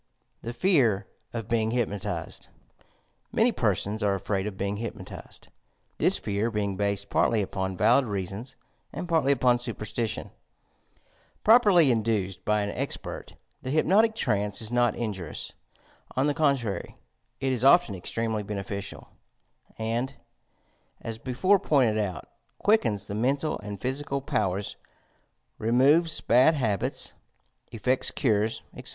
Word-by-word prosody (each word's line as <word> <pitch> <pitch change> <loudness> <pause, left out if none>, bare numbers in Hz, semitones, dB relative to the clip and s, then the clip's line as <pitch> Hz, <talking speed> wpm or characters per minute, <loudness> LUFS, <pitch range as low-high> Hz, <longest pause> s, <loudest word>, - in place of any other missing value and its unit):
THE 115 - -5
FE.VB 120 - +2 0.3
OF 115 -3 -5
BEING 115 -1 +1
HTPNOTIZED 110 -5 -3 0.9
Ulany - - +3
persona 105 +2 0
are 100 -1 +2
afraid 95 +1 -2
of 100 -2 -6
being 100 +1 -2
hypnotized, 115 +2 -8 0.3
— - - -44
^thia - - +3
fear 105 +2 -1
being 105 -3 -2
based 100 0 -1
partly 110 -3 +2
upon 95 -1 -3
valid 120 +7 +4
reasons 100 +5 -5 0.4
and 180 - -5
partly 160 -5 +2
upon 125 -2 +3
superstition. 115 -2 -4 1.1
Properly 205 - +6
induced 110 -5 -1
61/ 105 0 +2
an 100 - -2
expert, - - -5 0.3
the 130 - -5
hypnotic 200 +10 +3
trance 105 - 0
is 110 0 -4
not 120 -2 +2
injurious; 95 -9 -5 0.6
on 130 - +2
the 145 - +2
contrary, 135 - -1 0.4
it 135 -1 0
is 125 -1 -1
often 140 - +5
extremely 110 +4 -2
beneficial, 100 -1 -6 0.7
and, 120 +4 -2 0.8
as 115 -1 -6
before 185 - +2
pointed 130 - +2
out, 95 -5 -3 0.3
quickens 115 - +2
the 100 - -6
mental 135 +8 0
and 105 -1 -7
physical 140 +3 -2
powers, 100 -6 -2 0.8
removes 140 +9 +3
bad 130 +7 +5
habits, 110 -9 -2 0.6
effects 125 +3 +2
cures, 110 -4 0
etc. - - -5
115 Hz, 125 wpm, -27 LUFS, 100-135 Hz, 1.1 s, Properly